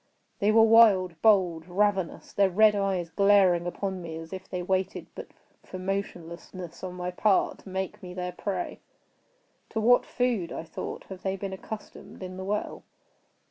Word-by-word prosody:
They 205 +1 +3
were 225 +1 +6
wild, 205 -7 +5
bold, 180 -7 +3
ravenous—their 195 0 +1
red 210 +3 +5
eyes 190 -4 -1
glaring 195 -3 +4
upon 190 +1 -3
me 165 -2 -6
as 165 +2 -9
if 185 0 -8
they 180 -1 -3
waited 190 +1 -1
but - - -8 0.4
for 185 - -8
motionlessness 180 -2 -5
on 180 -1 -5
my 180 0 -4
part 195 +2 +2
to - - -13
make 190 0 -4
me 180 -1 -9
their 180 0 -3
prey. 200 - -4 0.9
"To 220 - -2
what 245 +3 +5
food," 240 -8 -1
I - - -5
thought, 165 - -6
"have 190 -1 -8
they 190 0 -1
been 195 0 -5
accustomed 210 0 -9
in 185 0 -7
the 190 - -5
well?" 210 +2 -3
190 Hz, 165 wpm, -27 LUFS, 180-205 Hz, 0.9 s, were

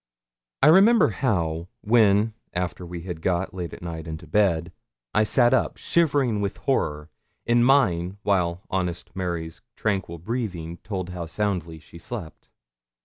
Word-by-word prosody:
I - - +8
remember 205 - +6
how, 85 -7 -1
when, 110 -1 +4 0.2
after 90 0 -3
we 85 -1 -6
had 85 -2 -6
got, 90 +2 0
late 90 -2 -5
at - - -10
night, 85 -1 -6
into 80 -1 -6
bed, 85 -6 +1 0.4
I 105 - +4
sat 120 +3 +3
up, 130 - +1
shivering 140 -10 +1
with 100 -1 -2
horror, 75 +1 -1 0.3
in 120 0 +4
mine, 100 -9 +3
while 90 -3 +1
honest 90 -2 -3
Mary's 85 -3 -4
tranquil 95 -5 -2
breathing 90 -4 -4
told 95 -4 -5
how 90 -2 -5
soundly 85 -3 -2
she 80 +2 -14
slept. 90 -3 -8
90 Hz, 145 wpm, -25 LUFS, 85-110 Hz, 0.4 s, I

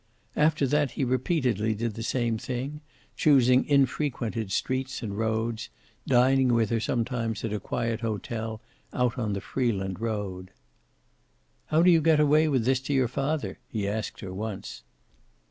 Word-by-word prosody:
After 150 -1 +3
that 145 +1 +2
he - - +1
repeatedly 125 - 0
did 115 +1 -2
the 115 - -7
same 115 -1 0
thing, 135 +5 -4 0.3
choosing 130 -4 +4
infrequented 125 -6 0
streets 130 +2 -2
and 100 -3 -4
roads, 110 +1 -1 0.4
dining 130 0 +4
with 115 -2 +1
her 115 - +2
sometimes 115 -1 -2
at 110 - -3
a 105 - -1
quiet 115 +2 -2
hotel 110 0 -4 0.3
out 125 0 0
on 110 -4 -1
the 100 - -3
Freeland 95 -8 -2
road. 100 -5 -4 1.2
"How 160 +2 +3
do 180 - +7
you 165 -2 +5
get 160 0 +4
away 150 +1 +4
with 130 -6 +1
this 130 0 +3
to 135 +2 -3
your 130 -2 +3
father?" 140 +5 -2
he 105 -3 -3
asked 110 +2 -3
her 95 -2 -6
once. 105 0 -6
120 Hz, 155 wpm, -27 LUFS, 110-135 Hz, 1.2 s, do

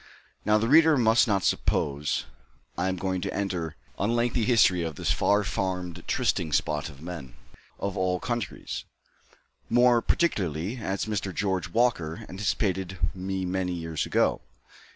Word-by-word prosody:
Now 105 0 +4
the 110 +1 0
reader 160 +2 +6
must 115 -1 +4
not 100 -4 +1
suppose 75 -1 0 0.5
I 90 +2 0
am 95 - -1
going 95 0 -2
to - - -2
enter 90 -6 -2 0.2
on 100 - +1
a - - +1
lengthy 120 -1 +1
history 105 -7 +4
of 80 -2 -3
this - - -1
far 105 +1 +3
famed 90 -2 -3
trysting 80 -3 0
spot 75 +1 0
of 70 0 -13
men 80 -8 -7 0.4
of 100 -1 -3
all 90 -1 0
countries, 120 +2 -4 0.9
more 120 0 +5
particularly 95 - 0
as 100 -4 -2
Mr. 100 -3 -2
George 95 -1 -1
Walker 85 -8 0
anticipated 95 -1 -1 0.2
me 95 0 -3
many 90 0 -1
years 80 -2 -3
ago. - - +2
95 Hz, 150 wpm, -27 LUFS, 85-110 Hz, 0.9 s, reader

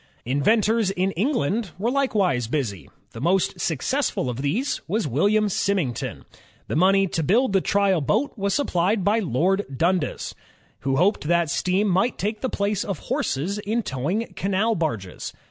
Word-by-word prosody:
Inventors 215 - +2
in 190 0 0
England 210 - -1
were 225 +6 0
likewise 200 - +1
busy. 115 - -3 0.2
The 115 - -9
most 180 +5 +1
successful 160 - -1
of 125 +2 -5
these 210 - -1
was 210 +1 0
William 205 - +2
Symington. 185 - -1 0.4
The - - -3
money 195 +4 +4
to 165 - -1
build 215 - +2
the 195 - +4
trial 200 -4 +2
boat 220 - 0
was 200 -3 -1
supplied 200 -7 +1
by 210 +4 +3
Lord 190 - +1
Dundas, 175 0 0 0.5
who 135 0 -1
hoped 180 +1 +2
that 170 -2 +2
steam 185 +7 +1
might 200 +6 +1
take 210 +2 -2
the 260 - -1
place 205 -1 -1
of 195 -5 -3 0.2
horses 180 +10 -1
in 220 +3 -1
towing 180 - -2
canal 195 +4 +1
barges. 130 - -3
195 Hz, 155 wpm, -24 LUFS, 155-215 Hz, 0.5 s, money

